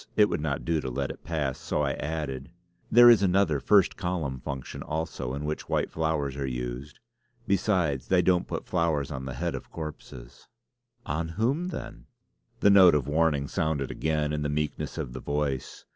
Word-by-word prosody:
It 105 -1 +5
would - - -2
not 70 -3 -2
do 80 -2 +1
to 65 - -4
let 70 +2 -2
it - - -12
pass 75 -5 -2
so 75 - -1
I 70 - +1
added: 70 -3 -4 0.4
"There 120 +1 +9
is 115 -4 +8
another 95 -6 +2
'first 100 +6 +3
column' 85 -8 -2
function 65 0 -6
also 75 -5 -3
in 70 +1 -4
which 75 +1 -4
white - - 0
flowers 80 -4 -1
are 70 -1 -2
used. - - -5 0.5
Besides, 90 - +1
they 90 -1 +3
don't 90 0 +2
put - - -4
flowers 80 -6 0
on 65 -2 -5
the 65 -1 -5
head - - -2
of - - -7
corpses." 65 -6 -9 0.6
"Of 80 +3 -2
whom 135 +11 +1
then?" 185 - -7 0.5
The 100 - +6
note 95 -5 +8
of 70 -3 0
warning 75 -2 +1
sounded 75 -4 -1
again 75 -1 -1
in 75 - -1
the 75 - -1
meekness 75 +1 -3
of - - -4
the 65 - -6
voice. 70 -3 -3
75 Hz, 185 wpm, -27 LUFS, 70-85 Hz, 0.6 s, There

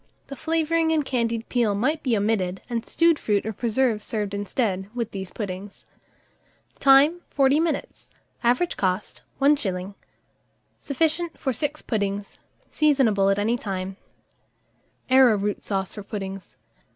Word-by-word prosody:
The 275 - -6
flavouring 325 +1 +1
and 310 -3 +1
candied 230 -3 -1
peel 230 -5 +1
might 295 +9 0
be 240 -5 +1
omitted, 200 -3 -1
and 235 -2 -2
stewed 335 -2 +3
fruit 205 -2 0
or 220 - -3
preserve 230 0 0
served 210 -2 -3
instead, 200 -1 -2
with 235 -2 -3
these 190 -2 -6
puddings. 200 -1 -7 0.9
Time. 280 +5 +5
40 275 +1 +3
minutes. 330 0 -3 0.3
Average 250 +9 +1
cost, 185 +1 -2 0.2
1s. 205 -10 +1 0.9
Sufficient 325 +4 0
for 265 - -1
6 295 +5 -3
puddings. 200 -2 -3 0.3
Seasonable 255 -10 +3
at 195 - +2
any 220 +4 +1
time. 190 -3 -4 1.2
ARROWROOT 215 -6 +4
SAUCE 195 -2 -2
FOR 210 - -7
PUDDINGS. 195 -2 -7
230 Hz, 125 wpm, -24 LUFS, 200-280 Hz, 1.2 s, Time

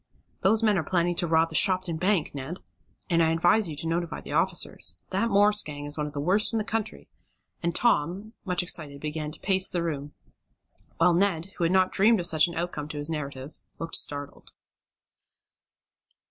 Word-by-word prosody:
"Those 215 +4 +3
men 210 -4 +3
are - - -2
planning 175 +1 +1
to 175 - 0
rob 165 0 +3
the 160 - -9
Shopton 185 -3 +2
Bank, 185 0 +1
Ned! 145 +5 -6 0.5
And 170 -1 +2
I 160 - +3
advise 175 +4 +3
you 155 - -5
to 165 - -3
notify 170 0 -2
the - - -10
officers. 85 +1 +1
That 200 +5 +1
Morse 205 0 +4
gang 145 -1 -7
is 145 0 -3
one 150 -1 -2
of 145 - -9
the 145 - -4
worst 195 +10 +3
in - - +1
the 215 - 0
country," 220 0 -4 0.5
and 170 0 -1
Tom, 200 0 0
much 180 -1 0
excited, 150 -5 -3
began 150 0 -4
to 150 - -9
pace 190 -1 +1
the 175 -2 -2
room, 145 -3 -4 0.8
while 180 - +4
Ned, 185 -1 0
who 170 - 0
had 165 - +1
not 185 0 +3
dreamed 220 +2 +4
of 175 - -3
such 160 -2 +4
an 170 - -8
outcome 165 -3 -3
to 150 - -7
his 145 +2 -1
narrative, 140 -2 -6 0.2
looked 165 0 -6
startled. 145 -1 -2
170 Hz, 195 wpm, -26 LUFS, 150-190 Hz, 0.8 s, Morse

